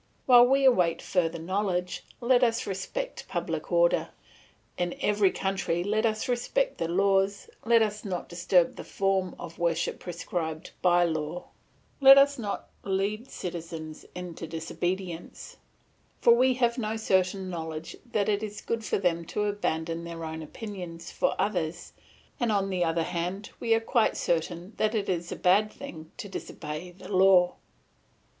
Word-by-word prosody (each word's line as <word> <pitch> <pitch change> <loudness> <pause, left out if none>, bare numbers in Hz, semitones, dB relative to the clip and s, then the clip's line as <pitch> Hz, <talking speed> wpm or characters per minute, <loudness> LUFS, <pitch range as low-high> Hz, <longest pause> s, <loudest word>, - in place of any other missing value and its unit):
While 245 -1 +8
we 270 +1 +3
await 180 -10 +4
further 170 -3 0
knowledge, 180 +1 -2 0.2
let 245 +1 +4
us 230 0 +2
respect 205 - -4
public - - -3
order; - - +3 0.7
in 175 0 -2
every 205 -2 +3
country 190 -3 -1
let 215 +3 +1
us 215 -1 -2
respect - - 0
the 165 - 0
laws, 195 - +1
let 230 -1 +5
us 210 0 -3
not 185 -4 -4
disturb 175 0 +2
the - - -6
form 195 -2 0
of 165 - -9
worship 170 0 0
prescribed 170 -2 -4
by 175 -1 +5
law; 160 +1 -3 0.5
let 270 0 +10
us 280 0 +5
not 205 -3 -4 0.2
lead 200 +2 -1
its - - -12
citizens 165 -3 -6
into 175 -2 -6
disobedience; 175 +2 -4 0.6
for 235 - +6
we 255 +2 +4
have 240 0 +1
no 220 -1 -2
certain 190 -2 +1
knowledge 160 -2 -5 0.2
that 210 -3 +1
it 205 -1 +1
is 210 -1 -5
good 230 -1 -2
for - - 0
them 175 -3 0
to 210 +5 -2
abandon 170 -5 -2
their 165 -1 -6
own 160 0 -5
opinions 175 -1 -7
for - - 0
others, 175 -5 -2 0.5
and 240 -2 +1
on 195 -1 +1
the 180 -1 +1
other 165 0 +1
hand 180 +4 -3
we 230 -1 +3
are - - +2
quite 225 0 +1
certain 170 +3 -1
that 215 +1 +1
it 205 -2 -1
is 175 -1 -2
a - - -2
bad 205 +4 +3
thing 160 - -10
to - - -6
disobey 175 -3 -6
the 180 +2 -13
law. 185 -1 +6
190 Hz, 160 wpm, -28 LUFS, 170-215 Hz, 0.7 s, let